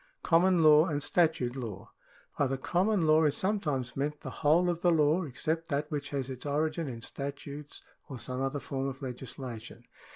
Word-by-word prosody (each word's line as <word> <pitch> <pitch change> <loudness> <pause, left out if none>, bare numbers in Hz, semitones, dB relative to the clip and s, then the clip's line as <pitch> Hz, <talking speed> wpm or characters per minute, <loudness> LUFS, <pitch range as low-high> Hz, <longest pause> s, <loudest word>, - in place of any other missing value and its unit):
Common 175 0 +4
law 155 0 +7
and 145 -3 -1
statute 155 -9 +1
law. 115 -7 -7 0.2
— - - -27
By 140 - +3
the 135 +1 -2
common 185 +7 +1
law 155 0 +5
is 145 -1 +2
sometimes 150 - -1
meant 145 +2 -2
the - - -6
whole 160 +4 +4
of 175 -1 -1
the 175 - +4
law 160 +2 +3
except 160 +4 -2
that 150 0 -2
which 145 -2 -3
has 135 -3 -2
its 130 -2 -7
origin 155 +2 -1
in 120 -3 -6
statutes 140 +3 -7 0.3
or 135 - -6
some 130 +1 -4
other 135 +2 -1
form 135 -1 -3
of 135 +1 -6
legislation. 125 -2 -7
145 Hz, 190 wpm, -30 LUFS, 135-160 Hz, 0.3 s, law